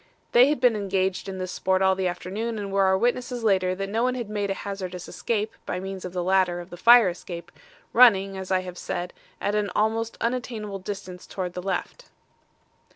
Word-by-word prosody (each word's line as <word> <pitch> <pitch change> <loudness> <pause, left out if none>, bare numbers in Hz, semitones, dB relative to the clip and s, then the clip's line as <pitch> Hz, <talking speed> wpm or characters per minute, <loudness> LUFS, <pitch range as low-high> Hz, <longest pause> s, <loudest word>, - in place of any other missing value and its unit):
They 250 +3 +7
had 300 - 0
been 245 -2 +4
engaged 195 -1 -1
in 190 - -5
this 185 0 -4
sport 190 0 +1
all 190 0 +5
the 190 -1 -1
afternoon 200 +6 -3
and 200 -1 -4
were 195 -1 +4
our 190 0 +4
witnesses 245 +2 -1
later 185 -3 +2
that 195 +1 -3
no 220 +3 -1
one 250 +1 +1
had 235 -4 -5
made 205 -1 -1
a 195 - -1
hazardous 185 -3 -6
escape 220 -1 -2
by 180 - -3
means 190 0 -6
of 180 - -5
the 180 -1 -2
ladder 185 -1 +2
of 175 +1 -10
the - - -6
fire 230 +3 +7
escape, 175 -1 -8 0.4
running, 195 -5 +6
as 190 -1 -6
I 185 -1 +2
have 180 -1 -8
said, 175 0 -4 0.3
at 205 - -1
an 210 -1 0
almost 225 +1 0
unattainable 230 -4 -3
distance 185 -2 -7
towards 180 -2 -4
the 180 - -5
left. 195 - -4
195 Hz, 210 wpm, -25 LUFS, 185-220 Hz, 0.4 s, They